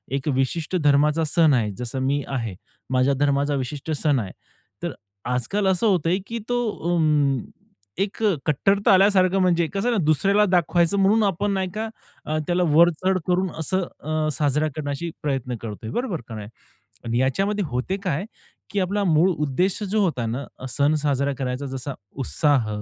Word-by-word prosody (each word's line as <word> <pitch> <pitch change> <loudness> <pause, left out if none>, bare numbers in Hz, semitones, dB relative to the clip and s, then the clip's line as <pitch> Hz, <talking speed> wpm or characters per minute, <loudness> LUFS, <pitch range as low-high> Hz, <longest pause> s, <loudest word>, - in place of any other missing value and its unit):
एक 135 +1 -2
विशिष्ट 150 +6 -1
धर्माचा 150 +2 +3
सण 155 0 +3
आहे. 110 -4 +1
जसं 125 +2 -4
मी 140 +2 0
आहे, 115 -7 -3 0.4
माझ्या 130 +2 +3
धर्माचा 145 0 +2
विशिष्ट 140 +3 -4
सण 150 -2 +1
आहे. 95 -4 -6 0.5
तर - - -2 0.4
आजकाल 125 - -1
असं 190 +4 +2
होतं 180 -6 +2
आहे, 185 - +2
की 230 - -4
तो 245 0 +1 0.3
उम्म, 150 -6 +2 0.6
एक 200 +2 -4 0.2
कट्टरता 195 +8 +3
आल्यासारखं 190 -1 +4
म्हणजे 175 -2 +3
कसं 200 +4 0
आहे 240 - +2
ना, 175 - 0
दुसऱ्याला 195 +8 +3
दाखवायचं 175 0 +2
म्हणून 205 +3 +4
आपण 200 +1 0
नाही 190 -1 -1
का, 220 +1 -3 0.6
त्याला 180 +1 +1
वरचढ 175 +3 +4
करून 180 +1 +1
असं 185 +4 0 0.2
अ, 155 +1 -1
साजरा 150 +1 +1
करण्याची 150 +2 -3
प्रयत्न 130 -4 -2
करतो 105 -3 -6
आहे, 110 - -5
बरोबर 240 -9 -2
का 115 - -7
नाही? 105 -1 -7 0.6
आणि 120 0 -1
याच्यामध्ये 195 +10 +1
होते 125 +9 -2
काय, 170 -1 -1 0.5
की 205 - 0
आपला 200 +2 0
मूळ 170 +1 +4
उद्देश 175 +5 0
जो 215 +1 +2
होता 130 -10 -1
ना 120 +5 -3
अ, - - -10
सण 140 +5 +2
साजरा 140 -1 +1
करायचा, 130 +1 -3
जसा 135 +1 -5 0.3
उत्साह 140 -7 +1
155 Hz, 170 wpm, -23 LUFS, 135-190 Hz, 0.6 s, आल्यासारखं